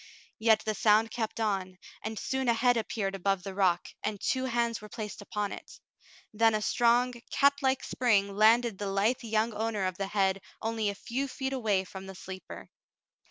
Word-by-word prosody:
Yet 220 Hz, -1 st, +4 dB
the 215 Hz, -, 0 dB
sound 215 Hz, +2 st, +3 dB
kept 225 Hz, -1 st, -3 dB
on, 190 Hz, -4 st, -1 dB, 0.2 s
and 220 Hz, 0 st, -5 dB
soon 265 Hz, +3 st, -2 dB
a 235 Hz, -, +4 dB
head 245 Hz, +1 st, +3 dB
appeared 215 Hz, -3 st, -2 dB
above 195 Hz, -1 st, 0 dB
the 195 Hz, -, -6 dB
rock, 185 Hz, -3 st, +1 dB
and 210 Hz, -2 st, -2 dB
two 260 Hz, +5 st, 0 dB
hands 235 Hz, -3 st, 0 dB
were 210 Hz, -, -10 dB
placed 215 Hz, -2 st, -6 dB
upon 205 Hz, 0 st, -3 dB
it; -, -, -10 dB, 0.5 s
then 225 Hz, +1 st, +4 dB
a 215 Hz, -, 0 dB
strong, 240 Hz, +2 st, +3 dB, 0.2 s
catlike 280 Hz, -2 st, +2 dB
spring 200 Hz, -5 st, +1 dB
landed 220 Hz, 0 st, +4 dB
the 205 Hz, -, -2 dB
lithe 200 Hz, +6 st, +1 dB
young 225 Hz, -1 st, 0 dB
owner 215 Hz, -2 st, -1 dB
of 185 Hz, -1 st, -2 dB
the 195 Hz, -, -1 dB
head 195 Hz, -1 st, +1 dB, 0.2 s
only 225 Hz, -1 st, -1 dB
a 200 Hz, -, -4 dB
few 260 Hz, +7 st, -3 dB
feet 265 Hz, 0 st, -4 dB
away 215 Hz, -7 st, +1 dB
from 190 Hz, 0 st, -9 dB
the 190 Hz, -, -8 dB
sleeper. 185 Hz, 0 st, -9 dB
215 Hz, 185 wpm, -29 LUFS, 195-235 Hz, 0.5 s, Yet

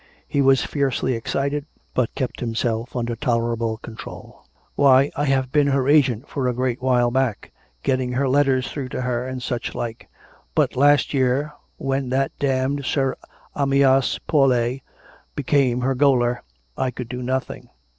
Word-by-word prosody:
He 140 Hz, -, +1 dB
was 135 Hz, -1 st, +4 dB
fiercely 135 Hz, -2 st, 0 dB
excited; 140 Hz, +5 st, -2 dB, 0.3 s
but 125 Hz, -3 st, 0 dB
kept 130 Hz, -, -3 dB
himself 115 Hz, 0 st, -2 dB
under 120 Hz, -1 st, -2 dB
tolerable 115 Hz, -3 st, -1 dB
control. 110 Hz, 0 st, -11 dB
" -, -, -38 dB
Why, 140 Hz, 0 st, +5 dB
I 145 Hz, -, 0 dB
have 130 Hz, -2 st, +1 dB
been 145 Hz, -1 st, +3 dB
her 135 Hz, -1 st, +1 dB
agent 140 Hz, -4 st, +3 dB
for 135 Hz, -3 st, -2 dB
a 125 Hz, -, 0 dB
great 125 Hz, 0 st, -1 dB
while 125 Hz, -2 st, +2 dB
back, 130 Hz, -4 st, -1 dB, 0.3 s
getting 130 Hz, -1 st, 0 dB
her 135 Hz, +2 st, +1 dB
letters 135 Hz, -1 st, +2 dB
through 135 Hz, -3 st, -5 dB
to -, -, -2 dB
her, 125 Hz, 0 st, -2 dB
and 130 Hz, -1 st, -5 dB
such 120 Hz, -1 st, -3 dB
like. 115 Hz, -1 st, -5 dB, 0.5 s
But -, -, +2 dB
last 145 Hz, +3 st, +4 dB
year, 135 Hz, +3 st, +1 dB, 0.2 s
when 135 Hz, -1 st, -2 dB
that 135 Hz, +1 st, 0 dB
damned 135 Hz, +1 st, 0 dB
Sir 135 Hz, -1 st, 0 dB, 0.4 s
Amyas 135 Hz, -1 st, +3 dB
Paulet 130 Hz, -3 st, +2 dB, 0.5 s
became 135 Hz, -3 st, +1 dB
her 135 Hz, +2 st, +1 dB
gaoler, 125 Hz, -3 st, +2 dB, 0.3 s
I 130 Hz, -, 0 dB
could 125 Hz, -1 st, -6 dB
do 125 Hz, +1 st, -5 dB
nothing. 130 Hz, +1 st, -3 dB
130 Hz, 155 wpm, -22 LUFS, 125-140 Hz, 0.5 s, Why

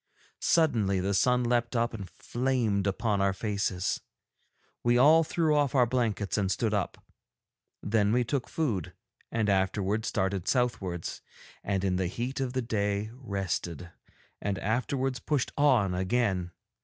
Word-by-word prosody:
Suddenly 115 Hz, -, +2 dB
the 95 Hz, +2 st, 0 dB
sun 125 Hz, +5 st, +3 dB
leapt 120 Hz, 0 st, 0 dB
up 120 Hz, 0 st, +1 dB
and 100 Hz, -5 st, -7 dB
flamed 120 Hz, -6 st, -1 dB
upon 100 Hz, 0 st, 0 dB
our 100 Hz, 0 st, +2 dB
faces; 100 Hz, -2 st, -1 dB, 0.8 s
we 120 Hz, 0 st, +4 dB
all 155 Hz, +6 st, +6 dB
threw 155 Hz, -1 st, +1 dB
off 145 Hz, -3 st, +1 dB
our 125 Hz, -2 st, +5 dB
blankets 110 Hz, -4 st, 0 dB
and 95 Hz, -2 st, 0 dB
stood 105 Hz, +3 st, 0 dB
up. 100 Hz, -3 st, -1 dB, 0.9 s
Then 105 Hz, -1 st, +2 dB
we 125 Hz, +2 st, +3 dB
took 130 Hz, +1 st, -2 dB
food, 115 Hz, -, -2 dB, 0.4 s
and 110 Hz, -2 st, 0 dB
afterwards 100 Hz, +2 st, +1 dB
started 95 Hz, -1 st, -1 dB
southwards, 95 Hz, -9 st, -1 dB, 0.4 s
and 95 Hz, -1 st, -1 dB
in 95 Hz, -2 st, +1 dB
the 95 Hz, -1 st, 0 dB
heat 120 Hz, +9 st, -4 dB
of 130 Hz, -2 st, -2 dB
the 130 Hz, -1 st, -1 dB
day 105 Hz, -1 st, -1 dB
rested, 95 Hz, -, -4 dB, 0.5 s
and 100 Hz, -1 st, -1 dB
afterwards 130 Hz, +4 st, -1 dB
pushed 140 Hz, +2 st, -1 dB
on 125 Hz, -10 st, +3 dB
again. 95 Hz, -1 st, 0 dB
110 Hz, 145 wpm, -29 LUFS, 95-125 Hz, 0.9 s, all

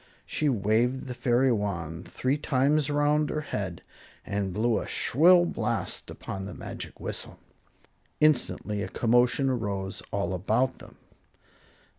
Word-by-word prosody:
She 150 Hz, -, 0 dB
waved 120 Hz, +3 st, +1 dB
the 125 Hz, -, -5 dB
fairy 125 Hz, +1 st, +2 dB
wand 90 Hz, -6 st, -3 dB
three 130 Hz, +2 st, 0 dB
times 145 Hz, +1 st, +2 dB
around 145 Hz, +1 st, +2 dB
her 155 Hz, -, -2 dB
head 95 Hz, -, -4 dB, 0.4 s
and 100 Hz, -1 st, -2 dB
blew 110 Hz, +4 st, +1 dB
a -, -, -6 dB
shrill 175 Hz, +6 st, +5 dB
blast 110 Hz, -, -2 dB
upon 95 Hz, 0 st, -6 dB
the -, -, -8 dB
magic -, -, -7 dB
whistle. -, -, -3 dB, 0.8 s
Instantly 125 Hz, -8 st, +2 dB
a -, -, -2 dB
commotion 120 Hz, +3 st, +2 dB
arose 100 Hz, -6 st, -2 dB
all 100 Hz, -2 st, -1 dB
about 110 Hz, +8 st, 0 dB
them. -, -, -14 dB
120 Hz, 130 wpm, -27 LUFS, 100-135 Hz, 0.8 s, shrill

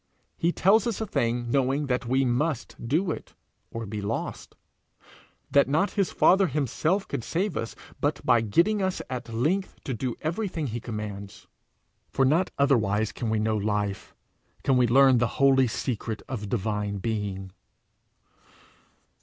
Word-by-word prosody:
He 170 Hz, -, +1 dB
tells 200 Hz, +6 st, +3 dB
us 230 Hz, -, -2 dB
a 220 Hz, -, -1 dB
thing 120 Hz, -, -1 dB
knowing 135 Hz, +2 st, +1 dB
that 125 Hz, -2 st, -1 dB
we 130 Hz, +2 st, +2 dB
must 130 Hz, +1 st, -1 dB
do 165 Hz, +7 st, +1 dB
it, -, -, -7 dB, 0.3 s
or 115 Hz, 0 st, -5 dB
be 105 Hz, 0 st, -5 dB
lost; 105 Hz, +3 st, -4 dB, 1.0 s
that 140 Hz, -1 st, +4 dB
not 160 Hz, +8 st, +2 dB
his 200 Hz, -3 st, 0 dB
Father 190 Hz, +1 st, +4 dB
himself 155 Hz, -, 0 dB
could 115 Hz, -, -4 dB
save 180 Hz, -, -1 dB
us 115 Hz, -, -4 dB, 0.2 s
but -, -, 0 dB
by 115 Hz, -, +5 dB
getting 170 Hz, -, +2 dB
us 190 Hz, -1 st, -1 dB
at 120 Hz, -2 st, -5 dB
length 160 Hz, +13 st, 0 dB
to 135 Hz, -, -3 dB
do 125 Hz, +1 st, -3 dB
everything 170 Hz, -1 st, -2 dB
he 120 Hz, -2 st, -3 dB
commands, 105 Hz, -4 st, -7 dB, 0.6 s
for 135 Hz, -, +2 dB
not 160 Hz, +7 st, +2 dB
otherwise 110 Hz, -7 st, +2 dB
can 115 Hz, -, -4 dB
we 110 Hz, -, +1 dB
know 110 Hz, 0 st, +1 dB
life, 105 Hz, -1 st, -2 dB, 0.5 s
can 135 Hz, -, +3 dB
we 125 Hz, -1 st, +4 dB
learn 130 Hz, +1 st, +6 dB
the 120 Hz, -, +2 dB
holy 135 Hz, -2 st, +5 dB
secret 110 Hz, -2 st, -3 dB
of 105 Hz, -7 st, -5 dB
divine 105 Hz, -2 st, -1 dB
being. 100 Hz, -2 st, -3 dB
125 Hz, 155 wpm, -26 LUFS, 110-155 Hz, 1.0 s, learn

